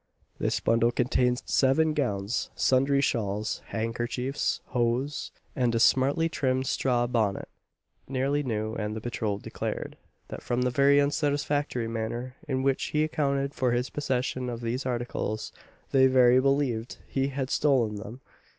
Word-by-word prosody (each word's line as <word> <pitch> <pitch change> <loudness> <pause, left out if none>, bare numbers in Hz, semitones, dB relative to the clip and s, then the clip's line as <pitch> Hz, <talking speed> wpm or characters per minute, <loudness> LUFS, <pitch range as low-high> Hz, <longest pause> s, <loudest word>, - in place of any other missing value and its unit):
This - - 0
bundle 115 +1 +2
contained 125 +1 +1
seven 155 +4 +3
gowns, 105 -7 -1
sundry 135 +2 +3
shawls, 105 -4 -1
handkerchiefs, 120 +4 -2
hose, 125 +4 -1
&c., - - -35
and 125 -3 +1
a - - +2
smartly 140 +7 +3
trimmed 130 -5 0
straw 120 -2 +1
bonnet 110 -5 0 0.6
nearly 135 +2 0
new; 110 -4 -2
and 105 -1 -3
the - - -3
patrol 110 -3 -2
declared, - - -5 0.3
that - - -7
from 125 +1 -1
the 125 - +1
very 140 +2 +5
unsatisfactory 145 -3 0
manner 115 +3 -4
in 130 -2 -1
which 135 -1 +1
he 150 0 +1
accounted 140 -2 0
for 125 -2 +1
his 125 +2 -1
possession 130 -3 -2
of 120 -1 -5
these 125 +3 -2
articles, 120 -3 -3 0.4
they 130 -1 +6
verily 130 -1 +5
believed 135 -4 0
he 135 0 0
had 135 -1 -3
stolen 120 -8 +2
them. 115 +5 -9
125 Hz, 145 wpm, -27 LUFS, 115-140 Hz, 0.6 s, they